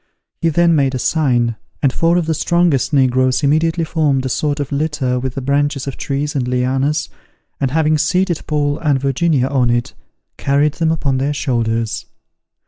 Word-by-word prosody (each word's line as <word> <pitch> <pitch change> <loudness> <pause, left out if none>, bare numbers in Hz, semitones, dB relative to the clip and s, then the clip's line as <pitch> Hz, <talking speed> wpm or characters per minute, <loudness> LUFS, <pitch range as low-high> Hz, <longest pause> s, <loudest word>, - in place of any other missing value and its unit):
He 165 - +2
then 170 +2 +3
made 135 -4 +1
a - - 0
sign, 120 -5 +1 0.3
and 135 -2 +3
four 165 +1 +2
of 175 - 0
the 160 - 0
strongest 170 -4 +1
negroes 130 -1 +2
immediately 160 +4 +2
formed 150 -5 0
a - - -1
sort 145 +3 -1
of 145 -1 -3
litter 140 -4 -1
with 130 0 -4
the 135 - -4
branches 140 0 0
of 140 - -5
trees 145 +1 -3
and 130 -3 -1
lianas, 130 +5 0 0.5
and 135 - 0
having 155 +1 +1
seated 180 0 +1
Paul 145 -1 0
and 145 -4 +1
Virginia 140 +1 +1
on 130 -3 +1
it, 120 0 -1 0.4
carried 140 +2 +1
them 160 -1 0
upon 140 -5 0
their 140 +2 0
shoulders. 115 -5 -1
140 Hz, 175 wpm, -17 LUFS, 130-155 Hz, 0.5 s, then